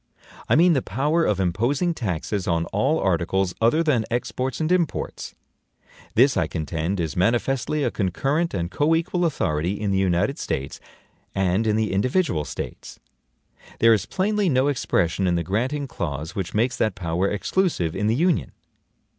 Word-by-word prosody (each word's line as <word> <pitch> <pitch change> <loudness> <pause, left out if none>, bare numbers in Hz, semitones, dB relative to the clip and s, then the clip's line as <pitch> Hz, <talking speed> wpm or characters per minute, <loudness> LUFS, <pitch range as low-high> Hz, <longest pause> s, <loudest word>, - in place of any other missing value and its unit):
I - - +5
mean 170 +3 +5
the 135 - +1
power 150 +8 0
of 100 -2 +1
imposing 120 - +1
taxes 100 - -3
on 85 -1 +1
all 135 +11 +2
articles 95 0 0
other 135 +9 +3
than 135 -8 +2
exports 125 +2 -2
and 160 +1 0
imports. 175 -4 -1 0.8
This, 130 +4 +5
I - - +1
contend, 80 +3 -3
is 80 -3 -2
manifestly 120 +8 +1
a - - 0
concurrent 135 - -1
and 85 -1 -2
coequal 165 +4 +1
authority 85 - -1
in 105 -1 -1
the 95 - +2
United 90 -2 +1
States 70 +1 -4 0.6
and 95 +3 +1
in 105 - +2
the 110 -2 0
individual 115 - +1
States. - - -7 0.8
There 115 0 +6
is 105 - 0
plainly 200 0 0
no 130 0 +2
expression 95 - 0
in 90 - +2
the 85 - 0
granting 130 - -1
clause 80 - -4
which 95 -4 -4
makes 120 +3 +1
that 110 -4 0
power 90 +1 -1
EXCLUSIVE 105 - 0
in 105 +2 0
the 110 - +2
Union. 170 +4 +1
110 Hz, 160 wpm, -23 LUFS, 90-145 Hz, 0.8 s, There